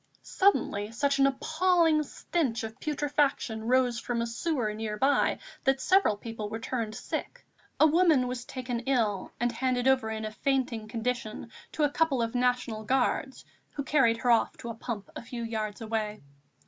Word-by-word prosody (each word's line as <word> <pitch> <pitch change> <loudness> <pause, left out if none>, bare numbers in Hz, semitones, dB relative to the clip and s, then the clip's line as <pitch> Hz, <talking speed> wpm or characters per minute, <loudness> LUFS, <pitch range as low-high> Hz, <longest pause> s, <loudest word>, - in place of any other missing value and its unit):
Suddenly 220 - +1
such 280 +3 +1
an 275 - +6
appalling 315 +3 +2
stench 290 -5 -2
of 220 +3 -7
putrefaction 285 -6 0
rose 250 -1 +3
from 240 -1 -2
a 235 - 0
sewer 235 -2 -1
near 215 0 -4
by 275 +5 +2 0.3
that 270 0 +2
several 375 - +3
people 220 -1 -6
were 220 - -4
turned 225 -1 -3
sick; - - -5 0.3
a - - +7
woman 315 -5 +4
was 250 -1 -4
taken 245 -2 -4
ill 220 -8 0
and 240 0 +1
handed 250 +1 0
over 260 -4 +3
in 220 0 -3
a 215 - -4
fainting 245 -3 -1
condition 230 0 -3 0.2
to 310 - 0
a 295 - +4
couple 315 -4 +1
of 230 - -3
National 245 -3 0
Guards, 265 +2 0 0.3
who 280 - -3
carried 265 -5 +3
her 245 +1 +2
off 230 - +2
to 235 - -7
a - - -3
pump 225 -3 -5
a - - -5
few 235 0 -6
yards 220 -2 -3
away. 215 -3 -3
245 Hz, 175 wpm, -29 LUFS, 225-275 Hz, 0.3 s, a